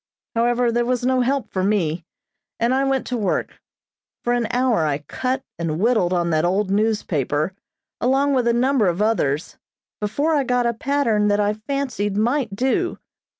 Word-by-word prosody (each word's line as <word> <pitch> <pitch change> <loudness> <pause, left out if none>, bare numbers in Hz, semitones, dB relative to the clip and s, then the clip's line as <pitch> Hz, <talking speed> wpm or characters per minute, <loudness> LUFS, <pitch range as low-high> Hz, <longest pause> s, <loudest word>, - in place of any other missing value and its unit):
However, 240 +1 +2
there 240 +1 +1
was 245 0 -1
no 255 0 +2
help 270 +1 -1
for 185 - -1
me, 175 -5 0 0.5
and 235 +2 +2
I 265 +1 +2
went 270 -1 0
to 250 - -2
work. 205 -5 -2 0.6
For 240 - +1
an 240 -2 0
hour 245 -8 +2
I 150 -2 0
cut 255 - -3 0.2
and 165 -1 -2
whittled 215 -5 +2
on 175 -2 +1
that 155 0 +2
old 190 +3 +1
newspaper, 190 - 0 0.5
along 270 +3 +2
with 250 -3 +1
a - - +4
number 245 -2 +2
of 175 +1 0
others, 180 -9 0 0.4
before 280 +10 0
I 290 -3 +2
got 250 -1 +1
a 235 - +1
pattern 230 -4 +1
that 205 0 +2
I 205 0 +2
fancied 220 -3 -3
might 235 -1 0
do. 265 - 0
230 Hz, 175 wpm, -22 LUFS, 195-255 Hz, 0.6 s, a